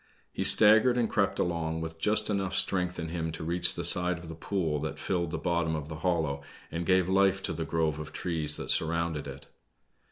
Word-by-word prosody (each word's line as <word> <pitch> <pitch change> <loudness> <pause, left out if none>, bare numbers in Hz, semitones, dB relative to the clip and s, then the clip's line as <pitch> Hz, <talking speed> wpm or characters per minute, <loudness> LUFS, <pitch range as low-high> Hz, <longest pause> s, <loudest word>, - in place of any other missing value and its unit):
He - - -2
staggered 110 +4 +6
and 120 -2 +1
crept 100 -3 0
along, 80 -2 -2
with 80 0 -7
just 105 +5 +1
enough 95 -2 -2
strength 90 -1 -1
in 80 -1 -5
him 80 -1 -3
to - - -6
reach 85 +2 +1
the - - -3
side 90 -1 +4
of 85 -1 -11
the - - -6
pool 80 -2 -2
that 75 +1 -5
filled 85 -3 -2
the 80 - -4
bottom 85 -1 -1
of 75 -1 -6
the 80 - -6
hollow 80 -5 -1 0.3
and 85 +1 -4
gave 95 -1 +3
life 95 0 +2
to - - -3
the 80 0 -4
grove 80 -1 -1
of 75 0 -8
trees 80 -4 0
that - - 0
surrounded 80 -2 0
it. 70 +1 -10
85 Hz, 215 wpm, -28 LUFS, 80-90 Hz, 0.3 s, staggered